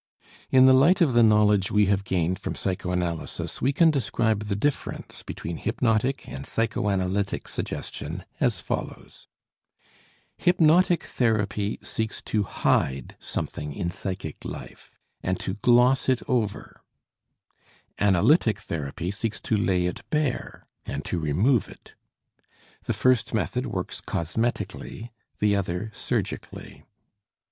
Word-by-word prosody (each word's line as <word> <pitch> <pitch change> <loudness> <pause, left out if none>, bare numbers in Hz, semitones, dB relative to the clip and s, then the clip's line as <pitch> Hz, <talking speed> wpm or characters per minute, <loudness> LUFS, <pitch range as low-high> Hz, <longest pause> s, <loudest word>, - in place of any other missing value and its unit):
In 130 0 +6
the 130 - +8
light 155 +9 +5
of 160 -8 +3
the 120 - +5
knowledge 105 -3 +4
we 105 0 +4
have 100 0 +1
gained 90 -1 0
from - - -4
psychoanalysis 90 -3 -3
we 130 - +3
can 160 +3 +5
describe 110 -5 0
the 100 -1 -1
difference 145 +8 -3
between 85 0 -6
hypnotic 120 +3 0
and 70 0 -7
psychoanalytic 100 -3 -1
suggestion 85 +5 -4
as 115 -10 +1
follows: - - -6 1.1
Hypnotic 175 +1 +4
therapy 105 -3 0
seeks 110 0 -3
to 110 - 0
hide 70 -8 0
something 75 0 -4
in 85 -1 -2
psychic 95 -4 -5
life, - - -8 0.3
and 95 +1 -1
to 95 - -3
gloss 125 +5 +4
it 130 -2 +2
over; 115 -5 -2 1.2
analytic 105 - +4
therapy 80 0 -4
seeks 110 +1 -3
to 110 - 0
lay 95 -4 +2
it 90 - -3
bare 150 -5 -2 0.2
and 70 +1 -5
to 90 - -2
remove 95 - +2
it. - - -15 0.9
The - - 0
first 130 -3 +2
method - - -1
works - - -4
cosmetically, 110 +5 -3 0.3
the 105 -1 +2
other 100 +2 -2
surgically. - - -4
105 Hz, 120 wpm, -26 LUFS, 90-125 Hz, 1.2 s, the